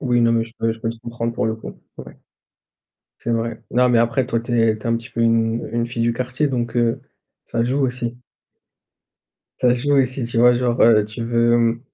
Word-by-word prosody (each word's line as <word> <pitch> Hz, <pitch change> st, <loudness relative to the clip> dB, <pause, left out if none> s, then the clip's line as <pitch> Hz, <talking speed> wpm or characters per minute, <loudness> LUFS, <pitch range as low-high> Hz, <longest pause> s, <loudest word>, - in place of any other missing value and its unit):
Oui, 120 Hz, -4 st, +1 dB
non 115 Hz, 0 st, +4 dB
mais 115 Hz, -1 st, +2 dB
je 115 Hz, 0 st, -13 dB
peux 115 Hz, 0 st, 0 dB
je 115 Hz, -, -8 dB
peux 115 Hz, -1 st, -2 dB
te 115 Hz, 0 st, -8 dB
comprendre 115 Hz, 0 st, -4 dB
pour 115 Hz, -, -1 dB
le 110 Hz, 0 st, -1 dB
coup. 110 Hz, -, -10 dB, 0.2 s
Ouais. -, -, -11 dB, 1.0 s
C'est 120 Hz, -, -3 dB
vrai. 115 Hz, 0 st, -2 dB
Non 125 Hz, +1 st, +3 dB
mais 120 Hz, -2 st, +4 dB
après 120 Hz, +2 st, +1 dB
toi, 115 Hz, -2 st, -1 dB
tu 120 Hz, -, -7 dB
es 110 Hz, -1 st, +2 dB
tu -, -, -16 dB
es -, -, -3 dB
un 115 Hz, -, +2 dB
petit 115 Hz, +2 st, -11 dB
peu 115 Hz, -, -3 dB
une 115 Hz, 0 st, +1 dB
une 115 Hz, 0 st, -1 dB
fille 120 Hz, 0 st, -4 dB
du 115 Hz, 0 st, +1 dB
quartier 130 Hz, +4 st, -1 dB
donc 120 Hz, -3 st, -3 dB
heu, 120 Hz, -1 st, +1 dB, 0.4 s
ça 115 Hz, -, -1 dB
joue 130 Hz, +4 st, 0 dB
aussi. 120 Hz, -1 st, -4 dB, 1.4 s
Ça 125 Hz, -1 st, +4 dB
joue 145 Hz, +4 st, 0 dB
aussi, 130 Hz, -1 st, +1 dB
tu 115 Hz, -, -5 dB
vois, 120 Hz, 0 st, +6 dB
genre, 120 Hz, -1 st, 0 dB
heu, 110 Hz, -2 st, +6 dB
tu 110 Hz, +2 st, -7 dB
veux, 120 Hz, 0 st, +2 dB
mmh 115 Hz, 0 st, +1 dB
115 Hz, 230 wpm, -20 LUFS, 115-125 Hz, 1.4 s, vois